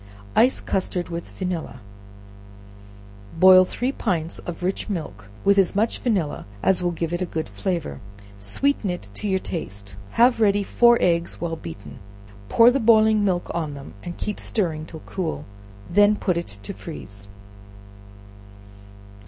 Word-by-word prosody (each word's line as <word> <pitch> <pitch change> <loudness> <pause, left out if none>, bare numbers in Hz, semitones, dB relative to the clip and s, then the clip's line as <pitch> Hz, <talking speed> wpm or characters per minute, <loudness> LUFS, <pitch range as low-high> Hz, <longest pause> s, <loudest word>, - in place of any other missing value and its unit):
Ice 250 +3 +4
Custard 180 -2 -2
with 170 0 -5
Vanilla. 170 -10 -4 1.6
Boil 185 +1 +8
three 250 +7 -2
pints 170 - -2
of 175 0 -7
rich 190 +4 -2
milk 105 - -5 0.2
with 200 0 +5
as 190 -1 +2
much 220 +3 +1
vanilla 190 - -1 0.2
as 185 -1 +3
will 175 - +1
give 165 0 -3
it 175 - -2
a - - +1
good 160 -1 -3
flavor; 170 - -3 0.4
sweeten 205 - 0
it 175 - -5
to 210 - -4
your 190 -1 +2
taste; 100 - -6 0.2
have 240 0 +5
ready 205 -1 +3
four 235 +4 +5
eggs 170 -1 +1
well 170 -1 -2
beaten, 100 - -10 0.5
pour 235 +1 +7
the 275 - +1
boiling 220 -2 +5
milk 180 -3 0
on 155 -4 -3
them, 140 0 -10
and 175 - -6
keep 210 - -4
stirring 160 -7 -1
till 160 -2 -10
cool; 175 -5 -4 0.5
when 205 +2 +5
put 185 -3 0
it 170 - -3 0.2
to - - -5
freeze. 100 +1 -8
180 Hz, 150 wpm, -23 LUFS, 160-205 Hz, 1.6 s, Boil